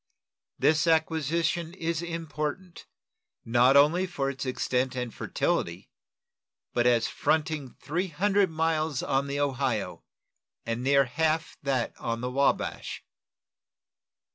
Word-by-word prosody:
This 155 +2 +3
acquisition 160 +1 +1
is 165 -2 -2
important, 165 +1 -5 0.6
not 120 +4 +5
only 165 +6 +4
for 140 -6 -2
its 135 0 -6
extent 130 0 -1
and 125 -2 -3
fertility, - - -2 0.8
but 120 0 +2
as 120 -2 +3
fronting 155 -4 -1
three 175 +6 -2
hundred 195 +4 +2
miles 160 -3 0
on 135 +1 0
the 140 +1 -2
Ohio, 135 -6 -1 0.6
and 115 +1 -2
near 140 +1 +4
half 160 +5 0
that 135 -4 -1
on 115 0 -3
the 125 0 -3
Wabash. 140 +2 0
150 Hz, 115 wpm, -28 LUFS, 130-165 Hz, 0.8 s, not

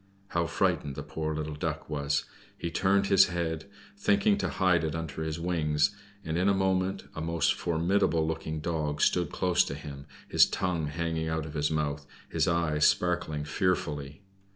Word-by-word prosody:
How 85 -1 0
frightened 70 -3 0
the - - -5
poor 80 -1 -3
little 75 0 -3
Duck 80 0 -3
was! 70 -1 -1 0.3
He 85 - -4
turned 100 +2 +2
his 100 -1 +6
head, 85 -1 -3 0.3
thinking 205 +1 +3
to - - 0
hide 90 -3 +2
it 80 0 -2
under 80 -2 -4
his 80 0 -3
wings, 75 -4 +1 0.3
and 80 +2 -1
in 95 +2 +3
a 100 - +3
moment 95 0 0
a 80 - -5
most 85 -1 +1
formidable 85 -1 +1
looking 80 -1 -3
Dog 75 -2 -2
stood 90 -1 +2
close 90 -1 +2
to 70 - -4
him, 70 -1 -9 0.2
his - - +6
tongue 90 -5 -1
hanging 80 +1 -2
out 80 0 -1
of 75 - -8
his 75 -1 0
mouth, 75 -2 -2 0.2
his - - +1
eyes 80 -3 +3
sparkling 85 -4 0
fearfully. 75 -1 -1
80 Hz, 175 wpm, -29 LUFS, 75-90 Hz, 0.3 s, his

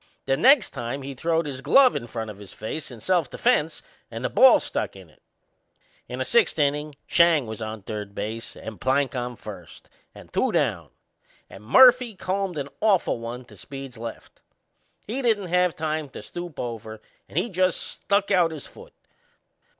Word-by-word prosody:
The 135 - +2
next 260 - +5
time 125 +4 -5
he 140 +1 -6
throwed 165 +4 0
his 135 -3 -5
glove 265 - +5
in 120 - -4
front 110 -1 -5
of 100 - -13
his 100 -2 -12
face 150 +8 -6
in 120 -4 -11
self 175 - +1
defense 155 +5 0 0.3
and - - -5
the - - -1
ball - - +7
stuck - - -3
in - - -14
it. - - -28 0.9
In - - -5
the - - -2
sixth 475 -3 +3
innin' 150 0 0
Schang 170 -5 +4
was 110 0 -7
on 110 -1 -6
third 105 -1 -6
base 115 +2 -5
and 110 -5 -9
Plank 135 0 +1
on 125 0 -3
first, - - -11 0.3
and - - -14
two - - +1
down, - - 0 0.6
and 95 - -12
Murphy 250 - +6
combed 190 -2 -2
an 140 -1 -4
awful 200 - +2
one 120 +2 -7
to 110 - -16
Speed's 135 +7 -9
left. 115 0 -9 0.6
He 245 +6 -3
didn't 215 -7 +1
have 180 -1 +2
time 155 -2 -3
to 135 - -10
stoop 175 -3 -8
over 110 -2 -6 0.3
and - - -8
he 180 - +2
just 185 -3 +1
stuck 200 0 -1
out 180 -4 +4
his 155 -3 -8
foot. 485 +2 -14
145 Hz, 180 wpm, -25 LUFS, 115-185 Hz, 0.9 s, ball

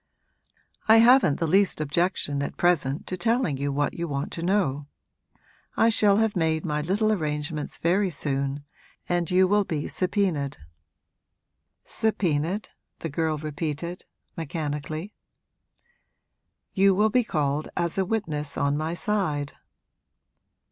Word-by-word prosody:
'I 220 +1 +8
haven't 235 - +5
the 165 - +1
least 195 +3 +3
objection 155 -1 0
at 140 - -4
present 155 -5 +1
to 185 - -4
telling 225 - +1
you 140 +1 -2
what 145 +1 0
you 170 0 -4
want 140 -2 -3
to 165 - -5
know. 165 -7 0 0.9
I 225 - +5
shall 205 -3 +4
have 220 -1 +1
made 160 -2 0
my 150 -2 -1
little 205 +7 +1
arrangements 150 -4 -2
very 185 +4 +1
soon 140 -2 -2 0.4
and 175 -2 0
you 185 +1 +4
will 205 +2 +3
be 155 -6 -3
subpoenaed.' 180 -7 -1 1.3
'Subpoenaed?' 185 -2 -1 0.3
the 165 - -3
girl 155 +1 -1
repeated, 155 +3 -4 0.3
mechanically. 155 +2 -4 1.6
'You 195 -1 +4
will 215 +2 +3
be 250 +2 +3
called 150 -6 -1
as 170 +1 0
a - - +3
witness 155 -9 -2
on 140 0 +1
my 155 +3 -2
side.' 165 -9 -1
165 Hz, 125 wpm, -25 LUFS, 145-195 Hz, 1.6 s, I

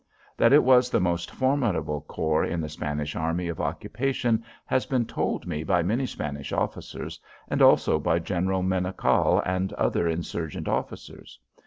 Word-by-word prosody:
That - - +4
it - - +7
was 125 0 +5
the - - +2
most 85 -1 0
formidable 105 - 0
corps 80 +1 0
in 85 - -2
the 80 -1 -3
Spanish 75 -1 -4
army 85 +2 -1
of 85 - -4
occupation 120 -2 -1 0.2
has 130 - 0
been 125 -3 +1
told - - -2
me 80 -3 -3
by 90 0 +2
many 120 +9 0
Spanish 70 - -5
officers - - -4 0.3
and - - -1
also 80 - +5
by 80 +2 +1
General 95 +2 -1
Menocal 95 0 +2
and 95 +1 -1
other 85 - 0
insurgent 80 -1 -3
officers. - - -5
90 Hz, 155 wpm, -26 LUFS, 80-110 Hz, 0.3 s, it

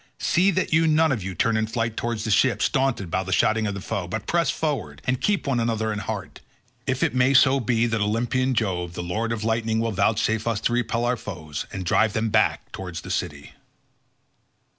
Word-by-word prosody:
See 185 +4 +2
that 185 -3 0
you 160 +1 +4
none 160 0 +3
of 125 -6 -1
you 95 -1 -5
turn 115 +6 +1
in 110 0 0
flight 115 -1 -2
towards 115 -2 -2
the 110 - -2
ships, 125 +5 +3
daunted 130 - 0
by 95 - +1
the 95 0 -6
shouting 110 +3 +2
of 100 - -3
the 100 - -6
foe, 100 -3 -3
but 105 +2 -4
press 170 -1 +1
forward 135 - -2
and 130 0 0
keep 205 -2 +1
one 135 -4 +1
another 110 -2 0
in 105 - -3
heart, - - -6 0.5
if 130 -1 0
it - - +1
may 130 +2 +3
so 130 +1 +6
be 120 -1 +1
that 115 -2 -1
Olympian 120 +5 0
Jove 90 -6 -1
the - - -4
lord 110 +6 -2
of 110 -2 -3
lightning 110 0 0
will 115 0 0
vouchsafe 110 +2 +1
us 115 -3 0
to 120 - 0
repel 120 0 0
our 125 0 +1
foes, 80 -8 -6
and 95 -2 -5
drive 110 +5 +2
them 110 0 0
back 110 +1 +1
towards 90 -4 -6
the 95 - -7
city." 75 -7 -4
110 Hz, 220 wpm, -24 LUFS, 100-125 Hz, 0.5 s, so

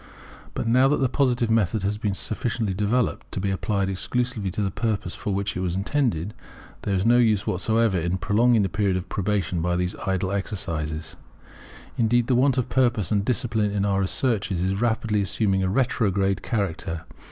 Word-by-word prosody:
But - - -2
now 125 +3 +4
that 145 - +2
the 130 - +2
Positive 125 -3 +1
method 110 -2 +1
has 105 +1 -1
been 105 -3 -1
sufficiently 110 0 -2
developed 105 +5 -1
to - - -2
be 100 +1 -1
applied 100 0 -1
exclusively 110 +2 -1
to 105 +4 -2
the 95 - -1
purpose 105 -4 -2
for 105 - -4
which 100 +1 -1
it - - -2
was 90 -1 -1
intended, 105 - -1 0.5
there 100 - -1
is 95 +2 0
no 120 +1 +5
use 110 -3 +3
whatever 110 -4 +1
in 85 +3 -1
prolonging 110 +4 +3
the - - +1
period 100 -1 0
of 90 0 -6
probation 95 -4 -1
by 90 +1 0
these 90 0 -1
idle 95 0 0
exercises. 80 -6 -3 0.8
Indeed 120 +1 +3
the 130 - +1
want 130 +1 +3
of 125 - 0
purpose 120 -8 +1
and 100 -2 +2
discipline 110 -2 0
in 100 0 -1
our 100 -1 +1
researches 100 -2 0
is 95 +3 -1
rapidly 110 -3 +1
assuming 95 0 0
a 95 - +1
retrograde 100 -5 +1
character. 85 -7 -2
100 Hz, 185 wpm, -24 LUFS, 95-115 Hz, 0.8 s, no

